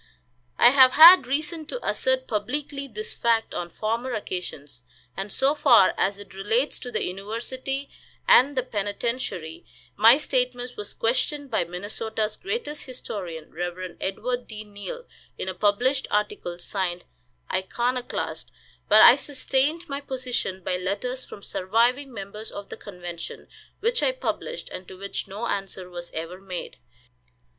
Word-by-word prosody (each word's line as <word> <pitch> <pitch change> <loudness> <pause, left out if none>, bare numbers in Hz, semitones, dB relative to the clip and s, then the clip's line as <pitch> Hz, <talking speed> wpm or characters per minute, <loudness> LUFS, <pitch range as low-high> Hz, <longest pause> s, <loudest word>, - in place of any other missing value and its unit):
I 240 - +8
have 260 -1 +7
had 330 -3 +10
reason 305 +3 -1
to - - -5
assert 260 0 +1
publicly 275 +6 -3
this 215 -3 -5
fact 230 -1 +1
on 175 -1 -3
former 230 +6 -2
occasions, 150 -10 -6 0.3
and 195 +2 -5
so 270 +7 +3
far 255 -10 +6
as 200 +1 +1
it 205 -2 -12
relates 225 +8 0
to 250 - -6
the - - -1
university 240 +8 -4 0.4
and 275 +2 +6
the 255 - +2
penitentiary, 205 -6 -3 0.3
my 225 +5 +7
statement 250 -3 -1
was 205 0 -6
questioned 275 +4 0
by 220 - +1
Minnesota's 210 +4 -3
greatest 415 -7 -4
historian, 185 - -6
Rev. 175 +2 -4
Edward 245 +6 -2
D. 215 -1 -7
Neill, 210 - -8 0.3
in - - -4
a 185 - -2
published 245 +8 +1
article, 210 -4 -1
signed 180 -1 -3 0.5
"Iconoclast;" 240 +7 -2 0.4
but - - +8
I - - +10
sustained 290 +4 -1
my 280 -1 -4
position 250 -8 -3
by 180 - 0
letters 205 +8 -2
from 200 - -11
surviving 240 +10 +1
members 210 0 -7
of 200 0 -8
the - - -6
convention, 175 -4 -8 0.3
which 470 +3 +1
I - - +2
published, - - -4
and 185 - -8
to 185 - -10
which 200 +1 -4
no 205 +4 -5
answer 195 -4 -4
was 175 0 -7
ever 165 +3 -6
made. 190 -2 -7
225 Hz, 145 wpm, -25 LUFS, 190-260 Hz, 0.5 s, had